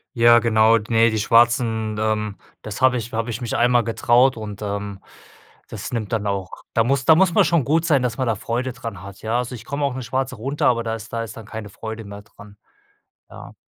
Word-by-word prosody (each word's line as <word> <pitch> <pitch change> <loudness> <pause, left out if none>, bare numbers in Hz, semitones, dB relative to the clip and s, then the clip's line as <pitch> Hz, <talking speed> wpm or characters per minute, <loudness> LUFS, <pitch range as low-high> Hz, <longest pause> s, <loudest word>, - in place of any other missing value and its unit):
Ja, 120 0 +6
genau, 110 0 +4
ne, 115 0 +4
die 110 - -1
schwarzen, 115 -1 +2
ähm, 105 -1 -1 0.3
das 110 +4 -7
habe 130 -1 +4
ich 115 0 -6
habe 115 +1 -2
ich 115 +2 -4
mich 120 - -3
einmal 120 0 +3
getraut 120 +3 +3
und, 105 -2 -7
ähm, 100 -1 -4 0.7
das - - -7
nimmt 110 -4 -3
dann 105 -2 -1
auch 100 -2 -4
da 115 - +3
muss 130 +2 0
da 160 - +7
muss 180 +1 +4
man - - +6
schon 170 -5 +2
gut 160 +5 +1
sein, 145 -6 +3
dass 125 -2 -2
man 130 - 0
da 115 - +1
Freude 120 +4 -3
dran 115 -6 -8
hat, 100 0 -11
ja? 110 +2 -1
Also, 125 0 -3
ich 115 -2 -9
komme 140 +1 -2
auch 140 - -1
'ne 130 - -5
schwarze 130 +2 -2
runter, 135 +7 -3
aber 115 -1 +2
da 115 -1 -2
ist 115 +1 -11
da 115 - -1
ist 115 - -9
dann 110 - -9
keine 110 -1 -8
Freude 110 +2 -7
mehr 100 0 -10
dran, 105 0 -16 0.7
ja. - - -12
115 Hz, 235 wpm, -21 LUFS, 110-125 Hz, 0.7 s, da